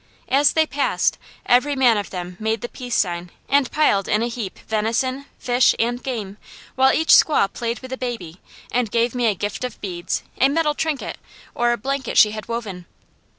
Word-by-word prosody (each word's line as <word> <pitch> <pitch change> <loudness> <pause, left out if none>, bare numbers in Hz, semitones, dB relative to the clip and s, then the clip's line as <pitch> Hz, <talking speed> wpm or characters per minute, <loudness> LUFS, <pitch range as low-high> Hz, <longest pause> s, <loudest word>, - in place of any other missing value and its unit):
As 280 +2 +4
they 320 0 +3
passed, 285 -2 0 0.3
every 280 +4 +3
man 250 -4 +4
of 205 -1 -3
them 180 -1 -6
made 220 +1 -1
the 240 - -5
peace 250 -3 -5
sign 175 -2 -1 0.2
and 280 -2 +2
piled 205 -11 +2
in 215 +2 +1
a - - 0
heap, 225 -5 -5
venison, 235 +5 -1
fish, 245 +1 +3
and 240 +2 -1
game, 215 -7 -5 0.4
while 265 0 +4
each 320 - 0
squaw 295 -10 +5
played 235 0 -3
with 260 0 -10
the 260 - -3
baby 195 -10 -6 0.3
and 245 -3 0
gave 235 +2 +1
me 245 -2 +1
a 210 - +2
gift 205 +5 -4
of 250 - -5
beads, 180 -3 -3 0.2
a 270 - +5
metal 300 0 +1
trinket, 305 -2 -3 0.3
or 240 0 +1
a 240 - 0
blanket 270 +3 -3
she 210 - +7
had 215 -1 -7
woven. 205 -7 -5
240 Hz, 195 wpm, -21 LUFS, 210-265 Hz, 0.4 s, she